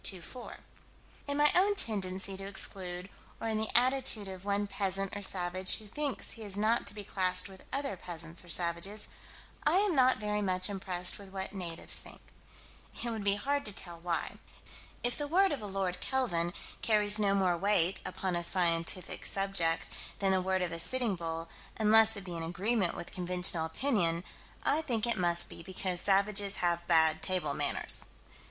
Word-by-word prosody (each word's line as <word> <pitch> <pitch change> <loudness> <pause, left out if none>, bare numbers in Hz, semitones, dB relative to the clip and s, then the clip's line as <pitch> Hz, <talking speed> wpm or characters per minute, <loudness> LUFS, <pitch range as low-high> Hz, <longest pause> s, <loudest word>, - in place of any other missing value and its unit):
In 285 0 -1
my 295 0 +6
own 400 +3 +4
tendency 190 - 0
to 195 +1 -7
exclude, 185 -2 -3 0.3
or 225 - -4
in 220 -1 0
the 220 - -1
attitude 250 -4 +3
of 190 -1 -8
one 205 0 0
peasant 195 -1 -2
or 205 - -5
savage 185 -1 +2
who 215 - -9
thinks 285 +6 -3
he 225 - -6
is 200 -2 -4
not 220 +3 +1
to - - -3
be 205 - -6
classed 185 -1 +1
with 190 -1 -13
other 275 -5 -2
peasants 170 -1 -3
or 175 - -14
savages, 175 +5 +1 0.6
I - - +2
am 400 -3 +2
not 255 -1 +4
very 210 0 -2
much 185 0 0
impressed 180 -2 -1
with 200 -1 -11
what 190 0 -5
natives 175 -4 0
think. - - -12 0.8
It 240 - -2
would 220 -2 -4
be 200 0 +3
hard 280 +7 -1
to 210 - 0
tell 175 -3 -3
why. 170 0 -3 0.6
If 245 +3 0
the 290 - -3
word 380 +5 +3
of 285 - -3
a 210 - -5
Lord 190 -2 -2
Kelvin 175 -11 0 0.3
carries 210 -1 +4
no 200 -1 +2
more 185 -3 +2
weight, 190 -1 +2
upon 175 -2 -3
scientific 170 0 0
subjects, 195 -4 +1 0.3
than 195 -1 +1
the 190 -1 +2
word 190 0 0
of 175 - -2
a 165 - -4
Sitting 240 +2 0
Bull, 165 -1 -5 0.3
unless 220 0 +6
it 200 - -6
be 180 -2 -7
in 165 - -4
agreement 185 +4 0
with - - -7
conventional 180 -2 +2
opinion 170 - 0 0.4
I 305 - +2
think 245 -8 -1
it 235 - +1
must 175 -1 +1
be - - -10
because 185 0 -2
savages 200 0 +2
have 175 -1 -1
bad 160 -1 +4
table 180 -6 0
manners. - - +1
195 Hz, 180 wpm, -31 LUFS, 175-215 Hz, 0.8 s, my